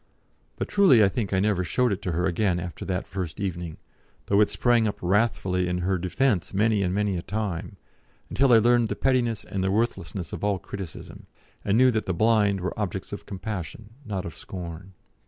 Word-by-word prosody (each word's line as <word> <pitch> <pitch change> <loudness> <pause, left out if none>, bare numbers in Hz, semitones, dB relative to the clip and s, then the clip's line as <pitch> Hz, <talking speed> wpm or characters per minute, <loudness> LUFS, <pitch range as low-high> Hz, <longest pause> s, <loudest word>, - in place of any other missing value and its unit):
But - - -3
truly 170 - +5
I 100 - +5
think 105 -1 -3
I 95 - +2
never 100 -2 +1
showed 125 +7 +1
it 100 - -5
to 90 -3 -2
her 90 +3 0
again 90 0 +1
after 85 -2 -6
that 90 +1 -2
first 95 -2 -5
evening, 85 -4 -4 0.5
though 100 +1 +3
it 105 - +4
sprang 120 -2 +2
up 105 - -3
wrathfully 95 -2 +1
in 90 0 -1
her 95 -1 +1
defence 95 +1 0
many 105 0 +2
and 90 -2 0
many 100 -1 0
a - - -3
time, 100 -4 -4 0.5
until 135 -2 +2
I 115 - +8
learned 120 0 +4
the - - -2
pettiness 125 -4 +1
and 95 -1 -3
the 95 - +1
worthlessness 105 -3 -2
of - - -6
all 100 -1 +1
criticism, 95 -2 -9 0.4
and 100 +2 +2
knew 130 +1 +6
that 110 -2 -2
the 95 - -1
blind 105 -1 +3
were 95 - -2
objects 95 -1 -3
of 100 - -7
compassion 100 0 -6
not 100 -6 -4
of 85 - -7
scorn. 90 +1 -8
100 Hz, 200 wpm, -26 LUFS, 90-110 Hz, 0.5 s, I